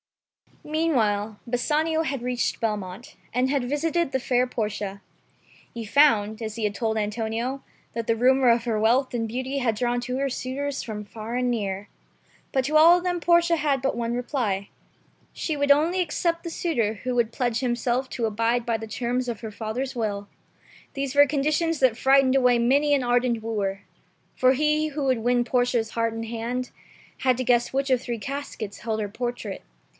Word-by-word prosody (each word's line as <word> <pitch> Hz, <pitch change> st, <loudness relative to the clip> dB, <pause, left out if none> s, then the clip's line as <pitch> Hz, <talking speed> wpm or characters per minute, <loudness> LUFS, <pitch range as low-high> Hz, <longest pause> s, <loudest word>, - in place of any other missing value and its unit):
Meanwhile 225 Hz, -10 st, 0 dB
Bassanio 310 Hz, +6 st, +1 dB
had 275 Hz, -5 st, -3 dB
reached 245 Hz, 0 st, -1 dB
Belmont, 210 Hz, -1 st, -4 dB, 0.2 s
and 250 Hz, +2 st, +1 dB
had 275 Hz, -3 st, 0 dB
visited 325 Hz, +2 st, 0 dB
the 265 Hz, -, 0 dB
fair 250 Hz, 0 st, +1 dB
Portia. 210 Hz, -4 st, -3 dB, 0.7 s
He 230 Hz, -1 st, -5 dB
found, 220 Hz, -4 st, +3 dB
as 220 Hz, -1 st, -4 dB
he 230 Hz, -, -4 dB
had 210 Hz, -1 st, 0 dB
told 220 Hz, 0 st, -1 dB
Antonio, 225 Hz, +5 st, -2 dB, 0.3 s
that 230 Hz, 0 st, -3 dB
the 230 Hz, -, +3 dB
rumor 255 Hz, +2 st, +4 dB
of 235 Hz, 0 st, +3 dB
her 225 Hz, -3 st, 0 dB
wealth 245 Hz, +5 st, +2 dB
and 230 Hz, -2 st, -1 dB
beauty 260 Hz, +4 st, -3 dB
had 235 Hz, -4 st, +1 dB
drawn 245 Hz, +2 st, 0 dB
to 250 Hz, +1 st, -3 dB
her 275 Hz, 0 st, 0 dB
suitors 270 Hz, +2 st, -3 dB
from 210 Hz, -2 st, -6 dB
far 220 Hz, +3 st, -7 dB
and 250 Hz, 0 st, +1 dB
near. 200 Hz, -3 st, -3 dB, 0.6 s
But 265 Hz, -1 st, +1 dB
to 305 Hz, +3 st, +3 dB
all 335 Hz, +3 st, +8 dB
of 355 Hz, -, -5 dB
them 355 Hz, -1 st, -1 dB
Portia 340 Hz, 0 st, +3 dB
had 285 Hz, -4 st, +1 dB
but 270 Hz, -, 0 dB
one 235 Hz, 0 st, -1 dB
reply. 240 Hz, -6 st, -2 dB, 0.6 s
She 315 Hz, -, -2 dB
would 285 Hz, 0 st, +3 dB
only 320 Hz, +6 st, +3 dB
accept 335 Hz, 0 st, -1 dB
that 340 Hz, -, -4 dB
suitor 235 Hz, -12 st, 0 dB
who 255 Hz, 0 st, -1 dB
would 235 Hz, -2 st, +1 dB
pledge 240 Hz, -2 st, -1 dB
himself 245 Hz, +1 st, -1 dB
to 235 Hz, -, -1 dB
abide 230 Hz, +3 st, 0 dB
by 230 Hz, -2 st, 0 dB
the 225 Hz, +1 st, -7 dB
terms 245 Hz, +3 st, -2 dB
of 235 Hz, -3 st, -4 dB
her 220 Hz, -2 st, -6 dB
fathei»'s 235 Hz, +5 st, -4 dB
will. 205 Hz, -3 st, -2 dB, 0.7 s
These 275 Hz, 0 st, -3 dB
were 285 Hz, 0 st, +8 dB
conditions 305 Hz, +3 st, 0 dB
that 255 Hz, -4 st, +3 dB
frightened 270 Hz, 0 st, +4 dB
away 250 Hz, -2 st, +4 dB
many 280 Hz, +5 st, +3 dB
an 270 Hz, -, 0 dB
ardent 245 Hz, -1 st, +1 dB
wooer. 205 Hz, -3 st, -2 dB, 0.5 s
For 255 Hz, 0 st, +4 dB
he 305 Hz, +2 st, +1 dB
who 290 Hz, -1 st, -3 dB
would 260 Hz, -3 st, +2 dB
win 245 Hz, +1 st, +2 dB
Portia's 245 Hz, -2 st, 0 dB
heart 230 Hz, -1 st, 0 dB
and 225 Hz, 0 st, -4 dB
hand, 235 Hz, +2 st, -4 dB, 0.5 s
had 255 Hz, -2 st, +2 dB
to 255 Hz, -, -1 dB
guess 240 Hz, -1 st, +2 dB
which 275 Hz, +1 st, 0 dB
of 255 Hz, -2 st, +3 dB
three 240 Hz, -3 st, -4 dB
caskets 265 Hz, -5 st, -6 dB
held 220 Hz, -1 st, -2 dB
her 205 Hz, -1 st, -2 dB
portrait. 240 Hz, -2 st, -4 dB
245 Hz, 185 wpm, -25 LUFS, 225-275 Hz, 0.7 s, all